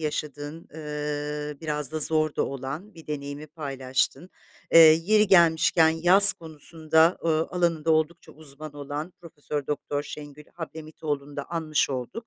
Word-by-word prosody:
yaşadığın, 150 +1 -5
ııı, 150 -1 -5
biraz 150 -3 -3
da 155 - -3
zor 155 0 +1
da - - +1
olan 140 +10 -7
bir 165 -1 -14
deneyimi 145 0 -6
paylaştın. 140 +2 -3 0.4
Eee, - - +8
yeri 165 +7 +6
gelmişken 165 -2 +4
yaz 180 +5 +7
konusunda, 160 +1 0
ııı, 160 -1 +1
alanında 165 -3 0
oldukça 160 +2 -1
uzman 155 0 -9
olan 145 +4 -6
Profesör 150 -3 -6
Doktor 145 0 -3
Şengül 145 0 -10
Hablemitoğlu'nu 155 -3 -6
da 140 - -4
anmış 160 -4 0
olduk. 135 - -5
155 Hz, 130 wpm, -25 LUFS, 145-165 Hz, 0.4 s, Eee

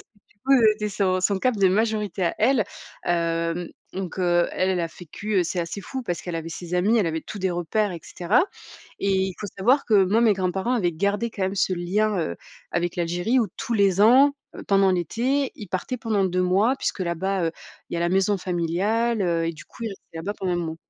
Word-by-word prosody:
que 215 - -33
du - - -31
coup 270 - +3 0.2
c'était 210 0 -3
son 190 -2 0
son 195 +1 +1
cap 255 +3 +1
de 195 -2 +4
majorité 210 -1 0
à 170 - 0
elle. 235 0 +3 0.4
Hem, 170 0 0 0.2
donc, 190 -1 -5
heu, 175 -1 +2
elle, 185 +1 +1
elle 185 -2 0
a 165 - -1
vécu 185 +6 -6
heu, 180 - +3
c'est 175 +1 -2
assez 170 +4 -4
fou 260 +7 -5
parce 175 -8 -3
qu'elle 175 - -5
avait 165 0 -4
ses 175 +1 -6
amis, 205 +6 +3
elle 205 - +2
avait 160 0 -1
tout 205 - -8
des 190 -1 0
repères 180 +4 0
et 170 - -7
cetera. 180 - +1 0.6
Et 200 - 0
il 190 -1 0
faut 210 - -4
savoir 255 +9 +3
que, 205 -4 +4
moi, 215 +5 +2
mes 225 -3 +5
grands 185 -2 0
parents 195 +6 -1
avaient 190 -9 +1
gardé 200 +7 0
quand 205 - -5
même 190 +1 0
ce 190 -1 +1
lien, 195 +4 0
heu, 85 - -2 0.3
avec 175 0 -1
l'Algérie 175 +8 +1
où 225 -4 +1
tous 240 - -2
les 200 -3 +3
ans 265 +7 +6 0.3
pendant 195 -1 +4
l'été, 245 - 0
ils 210 - -9
partaient 185 +8 -3
pendant 215 -3 0
2 185 0 +1
mois 195 +8 +3
puisque - - -3
là 170 -2 -1
bas, 190 +1 -1
heu, 165 - -2 0.4
il - - -3
y - - 0
a - - -2
la 170 - +2
maison 195 +2 +2
familiale, 195 +7 0
heu 170 -2 +1
et 165 - -1
du 155 -1 -12
coup - - -12
ils - - -1
restaient 195 -4 -12
là-bas 170 +5 -3
pendant 185 -2 -1
un - - 0
moment. 165 -2 -3
190 Hz, 240 wpm, -24 LUFS, 175-215 Hz, 0.6 s, ans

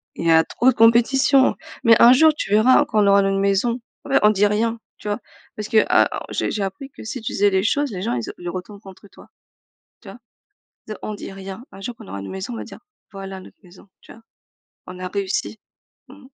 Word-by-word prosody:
Il - - -6
y 165 - +5
a 160 0 +5
trop 255 - +1
de 255 - +1
compétition 260 +4 +4 0.3
mais 230 -2 +5
un 240 +1 +8
jour, 310 +4 +5
tu 290 - -5
verras, 250 +7 +5
quand 215 -6 +1
on 200 - +2
aura 200 0 +5
notre 195 0 0
maison. 200 +5 0 0.3
En - - -10
fait, 275 - +4
on 210 - +7
dit 205 -1 +2
rien. 225 +2 -1 0.2
Tu 210 - -7
vois? 205 - -2 0.4
Parce 210 - -5
que 220 -1 +4
ah - - +4
oh - - -8
j'ai - - -2
j'ai 210 - -2
appris 195 +8 -6
que - - -13
si 235 +4 -6
tu - - -5
disais 205 +1 +3
les 190 -1 0
choses, 285 +5 0
les 185 -3 -6
gens, 125 - -2
ils 120 -2 -4
ont - - -7
ils 175 0 -6
retournent 190 +3 -8
contre 195 0 -15
toi. - - -17 0.7
Tu - - -12
vois? - - -11 0.7
Dire 215 - -7
on 215 - -5
dit 200 - -9
rien. 195 +4 -9
Un 195 - -12
jour, 230 +4 -6
quand - - -13
on - - -15
aura 100 +1 -6
une 100 - -8
maison, 190 +6 -6
on 230 - -5
va - - -6
dire: - - -12 0.3
«Voilà 195 -1 -8
notre - - -16
maison». 180 +3 -18
Tu - - -14
vois? 225 - -18 0.7
On 180 0 -9
a 185 - -4
réussi. 200 +2 -3 0.5
Mmh. 275 +1 -16
210 Hz, 255 wpm, -21 LUFS, 195-235 Hz, 0.7 s, un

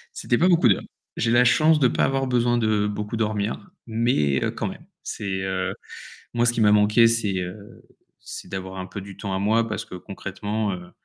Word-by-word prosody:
C'était 120 - 0
pas 180 - +3
beaucoup 170 -8 +5
d'heures. 95 - +2 0.3
J'ai 115 0 +1
la 120 +1 +5
chance 155 +4 +4
de 130 - +5
pas - - 0
avoir 135 0 0
besoin 120 -1 +2
de 110 -2 +1
beaucoup 105 +2 -4
dormir, 110 - -2 0.2
mais 110 - +1 0.2
quand - - -2
même, - - -9 0.2
c'est, 95 -2 -4
heu, 95 0 -2 0.6
moi 120 0 +2
ce 120 - +3
qui 115 - -1
m'a 105 -1 +5
manqué, 105 +2 +5
c'est, 110 -4 0
heu, 95 +3 -8 0.4
c'est - - -9
d'avoir 95 0 -6
un 95 - -4
peu 100 +1 -7
du 100 -1 -11
temps 100 -1 -4
à - - -1
moi 110 +3 +2
parce 110 - -4
que - - -9
concrètement, 100 +3 -4
heu, 90 -1 -9
105 Hz, 205 wpm, -24 LUFS, 95-120 Hz, 0.6 s, beaucoup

